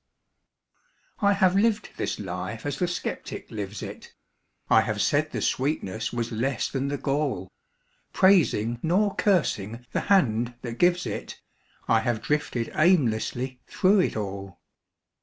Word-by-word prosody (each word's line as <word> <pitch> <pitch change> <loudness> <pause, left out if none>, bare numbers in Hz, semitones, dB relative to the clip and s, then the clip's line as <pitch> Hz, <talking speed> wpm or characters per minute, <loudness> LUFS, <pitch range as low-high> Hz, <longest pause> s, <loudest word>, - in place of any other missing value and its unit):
I 200 0 +4
have 190 -2 +3
lived 210 +1 +2
this - - -2
life 115 +3 -5
as 145 -2 -3
the 180 - +1
skeptic 175 - -5
lives 105 -1 -5
it; - - -9 0.5
I - - +6
have - - -2
said - - +2
the - - -3
sweetness 120 -6 -1
was 120 -1 -3
less 120 +3 -1
than 135 0 -2
the 140 0 -2
gall; 135 -10 -2 0.6
Praising, 130 - +3
nor 195 +5 +2
cursing, 120 - 0
the - - 0
Hand 120 - +3
that 120 -1 -6
gives 175 -2 +3
it, 105 - -5 0.5
I 115 - +4
have 110 -1 -1
drifted 145 -6 -1
aimlessly 130 -6 +1
through 195 +2 +3
it 180 - +1
all. 95 -3 -5
130 Hz, 140 wpm, -26 LUFS, 110-175 Hz, 0.6 s, I